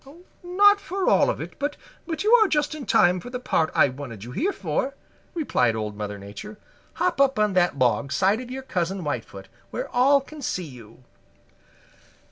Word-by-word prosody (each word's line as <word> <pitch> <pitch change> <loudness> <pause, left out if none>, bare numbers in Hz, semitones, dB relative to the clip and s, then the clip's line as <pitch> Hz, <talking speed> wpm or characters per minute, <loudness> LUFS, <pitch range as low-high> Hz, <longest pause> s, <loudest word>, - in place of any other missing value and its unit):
"Not 405 +3 +4
for 390 -1 -3
all - - +4
of - - -2
it, - - -8
but 290 0 -2 0.5
you 435 +3 +3
are 445 -3 +7
just 295 -3 0
in 300 -4 -7
time 180 +1 +4
for 245 - -9
the 250 0 -5
part 165 -9 +1
I - - +5
wanted 125 -6 -8
you 120 - -8
here 345 - 0
for," 230 - -2 0.4
replied 125 - +1
Old 105 -1 -4
Mother 105 -1 -5
Nature. 105 - -9 0.4
"Hop 355 -6 0
up 270 -1 +3
on 210 -2 +2
that 175 -5 +2
log 130 +2 +1
side 195 - +2
of 250 - -9
your 265 +1 -6
Cousin 185 -4 -2
Whitefoot, 145 -1 -5 0.2
where - - -4
all 275 +3 +4
can 295 +2 -11
see 185 -8 -3
you." 125 -3 -14
210 Hz, 185 wpm, -24 LUFS, -, 0.5 s, are